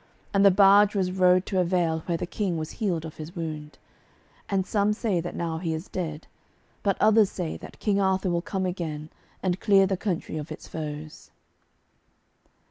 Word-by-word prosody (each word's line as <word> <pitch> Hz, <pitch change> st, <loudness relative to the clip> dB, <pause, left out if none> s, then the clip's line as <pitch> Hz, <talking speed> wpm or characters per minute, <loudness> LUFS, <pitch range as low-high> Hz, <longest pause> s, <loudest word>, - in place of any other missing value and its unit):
And 195 Hz, 0 st, +4 dB
the 200 Hz, -, +9 dB
barge 200 Hz, +2 st, +6 dB
was 185 Hz, -2 st, +1 dB
rowed 185 Hz, 0 st, +4 dB
to 190 Hz, -, -1 dB
a -, -, +4 dB
vale 170 Hz, -2 st, +1 dB
where 170 Hz, -2 st, 0 dB
the -, -, -3 dB
King 180 Hz, -1 st, -2 dB
was 155 Hz, 0 st, -4 dB
healed 180 Hz, -8 st, -2 dB
of 160 Hz, -, -9 dB
his 160 Hz, +4 st, -8 dB
wound. 155 Hz, -3 st, -5 dB, 0.7 s
And 195 Hz, -2 st, +1 dB
some 205 Hz, +1 st, +1 dB
say 210 Hz, -5 st, 0 dB
that 175 Hz, -, -6 dB
now 165 Hz, -1 st, -2 dB
he 165 Hz, -2 st, -2 dB
is 160 Hz, +4 st, -6 dB
dead, 160 Hz, -4 st, -4 dB, 0.6 s
but 200 Hz, -2 st, +1 dB
others 215 Hz, -1 st, +5 dB
say 175 Hz, -5 st, -4 dB
that -, -, -12 dB
King 200 Hz, -2 st, +1 dB
Arthur 190 Hz, -1 st, +1 dB
will 170 Hz, 0 st, 0 dB
come 190 Hz, 0 st, -2 dB
again, 160 Hz, -4 st, -4 dB, 0.3 s
and 185 Hz, -1 st, 0 dB
clear 195 Hz, -2 st, +5 dB
the 190 Hz, 0 st, -1 dB
country 180 Hz, -5 st, -3 dB
of 150 Hz, 0 st, -6 dB
its -, -, -8 dB
foes. 155 Hz, -1 st, -7 dB
180 Hz, 190 wpm, -26 LUFS, 160-195 Hz, 0.7 s, the